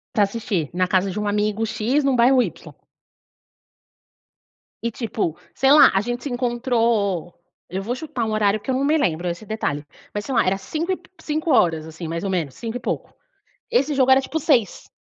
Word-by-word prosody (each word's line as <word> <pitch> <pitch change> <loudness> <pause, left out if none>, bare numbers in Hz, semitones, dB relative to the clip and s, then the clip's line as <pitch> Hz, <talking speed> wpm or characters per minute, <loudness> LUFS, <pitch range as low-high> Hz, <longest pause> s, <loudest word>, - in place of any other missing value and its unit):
Pra 210 - +5
assistir, 200 - -2
na 185 0 +1
casa 190 +1 +1
de 205 - -4
um 210 - -2
amigo 210 +1 0
x, 230 +6 0
num 275 -2 +2
bairro 250 +2 +5
y. - - 0 2.3
E 235 - -2
tipo, 215 -8 -3 0.2
sei 270 +1 +3
lá, 300 - +8
a 195 - +3
gente 240 +3 -4
se 290 - -3
encontrou 235 -7 0 0.3
eu 190 +2 -4
vou 235 +5 -3
chutar 265 -4 -4
um 220 - -2
horário 215 -1 +2
que 210 - -10
eu 260 - +2
não 265 - 0
me 305 - +3
lembro 180 - 0
esse 170 +4 -4
detalhe, 205 -9 -3 0.3
mas, 205 - -3
sei 265 +1 -3
lá, - - +4
era 190 +1 +1
cinco 320 - -3
e - - +2
p - - -23
17h, 260 - +1
assim, 160 +1 -7
mais 165 +1 -4
ou 195 - -2
menos, 165 -8 -1
cinco 230 - -5
e - - -8
pouco, - - -4 0.6
esse 305 - +2
jogo 265 -1 +3
era, 265 - +7
tipo, 310 +4 -3
18h. 260 -8 +1
225 Hz, 205 wpm, -22 LUFS, 190-260 Hz, 2.3 s, lá